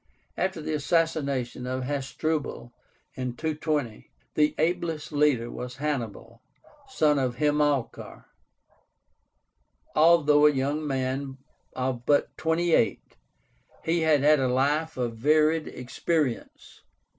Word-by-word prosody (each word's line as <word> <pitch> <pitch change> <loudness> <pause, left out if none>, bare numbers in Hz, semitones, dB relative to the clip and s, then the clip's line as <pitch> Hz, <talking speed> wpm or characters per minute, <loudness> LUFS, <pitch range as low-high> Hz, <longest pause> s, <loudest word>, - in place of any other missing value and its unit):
After 185 -3 -2
the 155 - -3
assassination 140 -5 -1
of 130 0 -3
Hasdrubal, 145 -1 -3 0.4
in 125 -2 -4
220, 150 -6 -3 0.2
the 150 0 +2
ablest 165 -2 -1
leader 145 -6 +1
was 125 0 -7
Hannibal, 120 -5 -4 0.5
son 150 - +2
of 125 -2 -1
Hamilcar. 145 -2 -1 1.7
Although 150 -2 +5
a - - +5
young 145 +3 -2
man 135 0 -2 0.4
of 125 -2 -3
but 145 -1 +2
twenty 165 +1 0
eight, 110 -9 +1 0.7
he 165 +1 +1
had 155 -3 +3
had 150 +1 +5
a 130 - +1
life 145 +5 0
of 120 -2 -2
varied 155 +4 +2
experience. 135 +1 -3
145 Hz, 110 wpm, -26 LUFS, 130-155 Hz, 1.7 s, Although